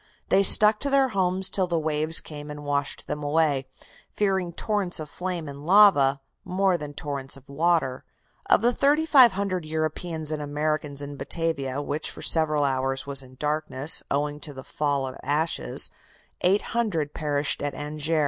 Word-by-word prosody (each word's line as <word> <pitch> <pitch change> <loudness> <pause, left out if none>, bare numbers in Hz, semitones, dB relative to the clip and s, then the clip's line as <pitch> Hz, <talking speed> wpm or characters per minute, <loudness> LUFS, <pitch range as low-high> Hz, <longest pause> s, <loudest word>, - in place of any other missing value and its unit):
They 195 - +4
stuck 210 +2 +6
to 280 - -2
their 275 -1 +3
homes 190 -2 0
till 185 -1 -1
the 170 -1 -1
waves 155 0 +1
came 150 -1 -9
and 150 0 -8
washed 140 -1 -2
them 150 - -5
away, 145 -3 +1 0.4
fearing 190 -4 -1
torrents 195 -1 -1
of 155 -1 -8
flame 180 -3 -4
and 140 0 -9
lava 155 -7 +5 0.2
more 190 0 +1
than 150 -3 -7
torrents 140 -2 -4
of 135 - -18
water. 145 -3 0 0.5
"Of - - +4
the 240 +1 +3
3,500 250 - +3
Europeans 155 0 -3
and 155 -1 -3
Americans 150 -1 -2
in 145 0 -8
Batavia 140 -2 -2
which 150 +2 -3
for - - -9
several 155 -2 +2
hours 135 -1 -1
was 140 -1 0
in 130 -1 -13
darkness, 150 0 +3
owing 145 +1 -2
to 145 -1 -6
the 130 - -9
fall 145 -2 -2
of 130 - -7
ashes 155 +3 +1 0.5
800 195 -4 0
perished 145 -2 0
at 145 0 -3
Anjer. 150 +2 -2
155 Hz, 160 wpm, -25 LUFS, 145-180 Hz, 0.5 s, stuck